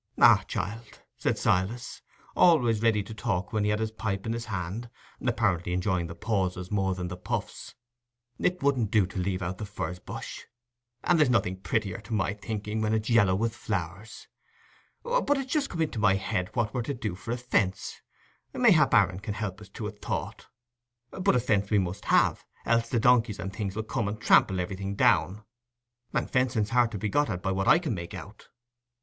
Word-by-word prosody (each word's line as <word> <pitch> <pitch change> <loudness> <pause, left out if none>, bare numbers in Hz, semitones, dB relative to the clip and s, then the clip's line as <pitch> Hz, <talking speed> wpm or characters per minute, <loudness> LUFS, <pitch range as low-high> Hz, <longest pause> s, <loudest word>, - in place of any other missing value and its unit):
"Ah, - - +7
child," 115 +2 -5 0.2
said - - 0
Silas, 105 +7 0 0.3
always 125 -11 +4
ready 110 -3 +3
to 110 - -9
talk 100 -3 -2
when 110 -1 +1
he 105 - +1
had 105 - +2
his 110 -1 -1
pipe 100 -3 -3
in 115 - -1
his 115 0 -4
hand, 100 +3 -4 0.3
apparently 100 -8 +1
enjoying 90 -2 0
the 85 - -8
pauses 95 -4 -2
more 95 -2 +1
than 90 -1 -4
the 90 - -5
puffs, 90 - -5 0.6
"it 180 -3 0
wouldn't 130 -7 +2
do 105 -2 +3
to 95 +1 -6
leave 95 +1 -1
out 90 +1 -4
the - - -4
furze 90 -3 -5
bush; - - -7 0.6
and 175 -2 +3
there's 150 -4 +5
nothing 100 -6 +2
prettier, 100 +2 -1
to 110 +2 -4
my 100 -1 0
thinking, 105 0 -4
when 110 0 +1
it's 110 +2 -2
yallow 105 -5 +5
with 115 +3 -1
flowers. 95 0 -5 0.8
But 475 - +1
it's 270 -1 -3
just 295 -3 +1
come 165 -2 -1
into 145 -7 -3
my 105 -3 +4
head 95 -1 -2
what 115 -3 0
we're 125 - -1
to 135 +4 -3
do 110 -6 -3
for 90 +5 -10
a 120 - -1
fence—mayhap 145 - 0
Aaron 95 -4 +3
can 105 0 -5
help 105 -2 -4
us 105 - -12
to 110 - -7
a 105 - -3
thought; 105 - -5 0.6
but 190 -3 +1
a - - +4
fence 100 -4 +1
we 105 - +3
must 95 -1 -2
have, - - +3 0.2
else 115 0 +2
the 120 - +1
donkeys 120 -3 +3
and 95 +1 -6
things 100 -2 -4
'ull 110 - -1
come 110 -1 -2
and 105 +1 -4
trample 95 -4 +4
everything 95 +2 -3
down. 100 +2 +2 0.7
And - - 0
fencing's 125 -5 +1
hard 120 -1 +4
to - - -2
be 110 - -2
got 145 +8 +1
at, 90 - -4
by 95 - 0
what 95 0 -1
I - - +7
can 165 -7 -2
make 85 +1 -6
out." 100 +3 -11
105 Hz, 200 wpm, -28 LUFS, 95-115 Hz, 0.8 s, Ah